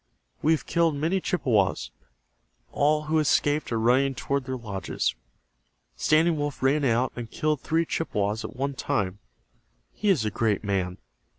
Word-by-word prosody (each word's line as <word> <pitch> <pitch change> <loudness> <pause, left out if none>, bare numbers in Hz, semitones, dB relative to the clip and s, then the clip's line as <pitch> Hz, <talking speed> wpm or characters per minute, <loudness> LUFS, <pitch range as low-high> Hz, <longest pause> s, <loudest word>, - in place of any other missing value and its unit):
"We 155 - +3
have 160 - -2
killed 165 -3 +2
many 165 +6 0
Chippewas. 105 - +1 0.8
All 150 +1 +2
who 155 +1 +1
escaped 150 -1 +1
are 115 - 0
running 130 +4 +3
toward 140 +1 -2
their 130 0 -3
lodges. 100 - -2 0.8
Standing 155 - +3
Wolf 145 -2 -3
ran 140 +3 +3
out 125 0 +1
and 120 -2 -6
killed 150 +1 -1
three 165 +1 +1
Chippewas 105 -9 -1
at 110 - -7
one 140 +2 -2
time. 100 -6 -2 0.7
He 210 - -1
is 150 - +3
a 105 - -1
great 105 -1 0
man. 95 -3 -1
135 Hz, 155 wpm, -26 LUFS, 110-155 Hz, 0.8 s, We